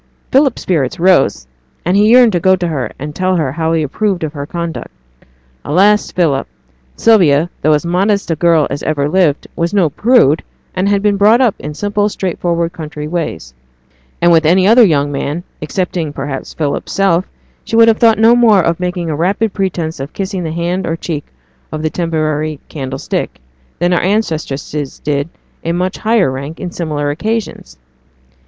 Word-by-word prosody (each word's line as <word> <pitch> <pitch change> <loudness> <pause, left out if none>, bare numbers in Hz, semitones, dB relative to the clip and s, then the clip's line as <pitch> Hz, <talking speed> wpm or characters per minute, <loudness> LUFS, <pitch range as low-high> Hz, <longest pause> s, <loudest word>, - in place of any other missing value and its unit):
Philip's 270 -2 +2
spirits 150 -8 -1
rose, 170 - +3 0.4
and 180 +3 +1
he 205 +1 +4
yearned 245 -1 +6
to 175 - 0
go 190 +2 +4
to 175 -1 -3
her 135 -9 -3
and 150 +2 -6
tell 185 +3 0
her 155 -7 0
how 160 +2 -1
he 165 -1 +1
approved 190 +5 -1
of 155 -1 -3
her 140 -2 -6
conduct. 170 -1 -5 0.7
Alas, 200 +7 +2
Philip! 150 -7 0 0.5
Sylvia, 175 -7 +3
though 155 - +3
as 150 +2 0
modest 195 +2 0
a - - +1
girl 165 -1 +3
as 140 - -3
ever 145 -2 -1
lived, 160 -3 +1
was 170 +4 -1
no 175 -7 +2
prude, 215 - +3 0.3
and 185 +2 0
had 200 0 +1
been 205 -1 +2
brought 215 +4 +5
up 245 -6 +3
in 150 +1 -7
simple, 205 +5 0
straightforward 170 -3 -2
country 150 -3 -7
ways; 150 - -4 0.7
and 175 - +5
with 165 -1 +4
any 180 +4 +3
other 230 +4 +6
young 145 -7 +2
man, 145 +4 -3 0.2
excepting, 170 0 -2
perhaps, 135 -1 -5
Philip's 145 -3 -3
self, 190 -2 +1 0.3
she - - -4
would 230 0 +6
have 225 -1 +3
thought 225 -2 +4
no 225 +2 +5
more 220 -6 +4
of 170 +1 0
making 180 -1 -3
a - - -2
rapid 195 +7 0
pretence 170 -6 -3
of 135 +2 -6
kissing 190 -1 -3
the 160 - -3
hand 170 +3 -2
or 165 - -1
cheek 160 -3 -5 0.5
of 155 0 -5
the 155 - -1
temporary 155 -3 -2
'candlestick', 135 -2 -4 0.4
than 175 +1 +1
our 175 - +2
ancestresses 155 -8 -2
did 145 +1 -2 0.3
in 165 +1 -2
a - - -1
much 185 +1 -2
higher 220 - +2
rank 140 +4 -6
on 180 - -5
similar 150 -4 -2
occasions. 215 - -4
170 Hz, 180 wpm, -15 LUFS, 150-195 Hz, 0.7 s, yearned